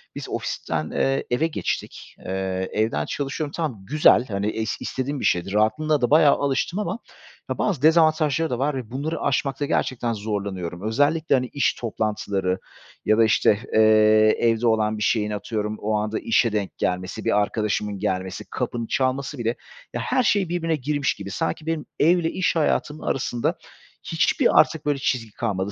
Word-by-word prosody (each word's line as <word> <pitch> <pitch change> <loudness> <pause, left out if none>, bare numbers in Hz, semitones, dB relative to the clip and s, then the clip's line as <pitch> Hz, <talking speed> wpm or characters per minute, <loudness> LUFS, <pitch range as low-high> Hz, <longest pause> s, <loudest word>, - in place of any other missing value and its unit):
biz - - -6
ofisten, 80 -1 -3
eee, 135 0 0
eve 135 +7 +1
geçtik. 160 - -5
Eee, 95 0 -2
evden 110 -9 0
çalışıyorum 145 +1 -3
tamam 150 -10 -3
güzel, 145 -1 +4
hani, 100 -1 -2
es 110 +1 -2
istediğim 135 +2 -3
bir - - -3
şeydi. 90 +3 +1
Rahatlığına 110 +9 +2
da 120 - +2
bayağı 150 -1 +6
alıştım 140 +7 -1
ama 205 +2 -3 0.5
ya - - -2
bazı 185 -11 0
dezavantajları 155 -1 +3
da 125 - -2
var 140 +2 0
ve 125 -4 -6
bunları 145 +5 -3
aşmakta 140 +1 0
gerçekten 120 -4 -1
zorlanıyorum. 100 -5 -4
Özellikle, 145 +8 +2
hani, 130 -1 0
iş 140 -3 +2
toplantıları 105 -4 -2 0.5
ya 110 - +3
da, 115 - +6
işte, 105 -1 +3
eee, 110 0 +5
evde 115 0 +2
olan 110 -1 +2
bir 105 - -2
şeyin 105 -1 +1
atıyorum 105 0 -3
o 110 +1 -1
anda 105 +1 -2
işe 115 0 +2
denk 105 -2 -3
gelmesi, 90 +1 -2
bir 105 - +3
arkadaşımın 105 -1 -2
gelmesi, 95 -2 -3
kapının 115 -1 -3
çalması 135 +3 -1
bile 120 0 -1 0.4
ya, - - -2
her 255 - +1
şey 200 -5 +2
birbirine 165 -2 0
girmiş 145 0 -1
gibi. 100 -1 -8
Sanki 95 - -3
benim 160 -2 -2
ev 170 +4 +5
ile 165 -2 -1
iş 185 -2 0
hayatımın 155 -1 0
arasında, 120 -3 -1 0.5
hiçbir - - +2
artık 160 - +2
böyle 145 -2 +1
çizgi 120 -5 -1
kalmadı, 100 -3 -2
120 Hz, 170 wpm, -23 LUFS, 105-145 Hz, 0.5 s, bayağı